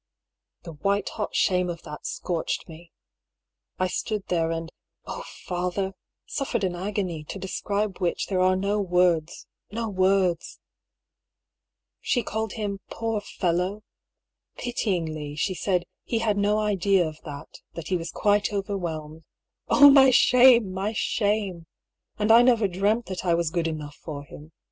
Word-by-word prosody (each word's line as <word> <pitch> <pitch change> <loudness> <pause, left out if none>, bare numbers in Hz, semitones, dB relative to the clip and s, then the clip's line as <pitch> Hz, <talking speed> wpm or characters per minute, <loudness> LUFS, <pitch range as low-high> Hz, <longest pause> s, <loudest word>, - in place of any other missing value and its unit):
The 170 - -8
white 200 +6 -1
hot 210 - -4
shame 180 -2 +2
of 170 -1 -6
that 150 - -7
scorched 170 -3 -3
me. 165 0 -13 0.9
I 185 - +1
stood 210 +2 -3
there 165 -2 +1
and 165 0 -4 0.2
— - - -50
oh, - - -6 0.2
father! 180 +2 -2 0.2
— - - -63
suffered 270 -6 -2
an 185 -2 0
agony, 185 -4 -3
to 195 - -6
describe 200 +1 -2
which 175 -3 0
there 190 -2 -1
are 185 0 +4
no 200 +2 0
words 180 -4 +1
— - - -40
^no 225 -1 -3
words! 185 -2 +1 1.4
She 245 - 0
called 220 -2 -3
him 205 -3 -3
" - - -46
poor 225 -2 -2
fellow! 185 +3 -1 0.4
" - - -47
Pityingly, 165 -11 -2
she 185 +5 0
said 180 0 0
" - - -62
he 230 - -1
had 225 -2 +1
no 205 +1 +2
idea 200 -4 +2
of 155 0 -9
that, 145 -3 -9 0.2
that 165 -1 -6
he 185 - +1
was 165 -1 -3
quite 205 0 +1
overwhelmed." 170 -6 -4 0.5
Oh! 285 0 +8
my 270 -1 +8
shame, 245 -4 +6
my 195 +3 -2
shame! 205 -6 -1 0.5
And 210 +1 +2
I 230 +1 +9
never 235 -4 +4
dreamt 205 +5 0
that 185 -2 -5
I 175 -2 +3
was 170 -2 0
good 170 -1 0
enough 150 -2 -6
for 145 -3 -7
him. 150 +2 -13
190 Hz, 165 wpm, -25 LUFS, 170-210 Hz, 1.4 s, I